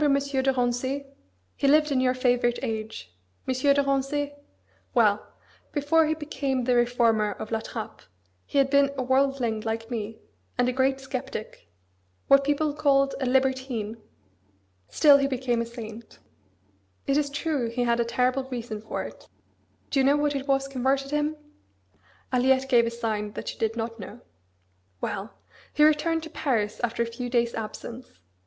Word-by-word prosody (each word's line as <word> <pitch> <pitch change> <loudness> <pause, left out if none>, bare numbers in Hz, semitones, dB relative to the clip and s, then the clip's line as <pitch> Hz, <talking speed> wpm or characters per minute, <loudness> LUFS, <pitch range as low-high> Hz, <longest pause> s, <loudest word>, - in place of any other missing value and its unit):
de 300 - +4
Rancé? 270 -1 0 0.5
He 280 - 0
lived 300 +1 +4
in 260 -2 +2
your 255 0 +2
favourite 245 -1 +2
age; 215 - -5 0.3
M. 260 - +1
de 280 +2 +3
Rancé. 275 +1 -1 0.6
Well! 210 -4 +4 0.5
before 310 +2 +3
he 315 - +1
became 275 -4 -2
the 250 +1 +2
reformer 235 -3 +2
of 215 - -8
La 225 - +1
Trappe 220 0 -7 0.5
he - - -3
had 275 -1 +3
been 280 -1 +5
a 260 - 0
worldling 260 -3 +1
like 225 +1 -4
me, 220 -1 -4 0.4
and 245 0 +3
a 250 - 0
great 265 +1 +1
sceptic 265 -4 -6 0.6
what 275 0 +6
people 290 +1 +1
called 275 -2 +3
a 260 - 0
libertine. 260 -4 0 0.9
Still 290 -2 +6
he 275 - +2
became 250 -3 0
a 230 - -3
saint! 230 -1 -9 0.9
It 275 - +1
is 290 -1 +1
true 285 -4 -1
he 245 +2 -1
had 235 0 +1
a - - +4
terrible 250 +3 0
reason 235 -4 -5
for 220 - -4
it. - - -11 0.6
Do 275 - +2
you - - +4
know 280 +2 +4
what 295 0 +1
it 275 0 -3
was 270 0 +2
converted 275 +1 0
him?" 295 +1 0 1.0
Aliette 260 +1 +3
gave 240 -3 +4
a - - +1
sign 220 -3 -3
that - - -5
she - - -7
did 225 0 0
not 230 0 -4
know. 210 +5 -9 0.8
"Well! 200 +3 -4 0.4
he 300 - +3
returned 310 +2 +3
to 320 - -8
Paris 225 -10 -1
after 235 0 0
a - - -3
few 235 +2 -5
days' 235 -1 +1
absence. 230 +3 -7
260 Hz, 165 wpm, -26 LUFS, 235-275 Hz, 1.0 s, what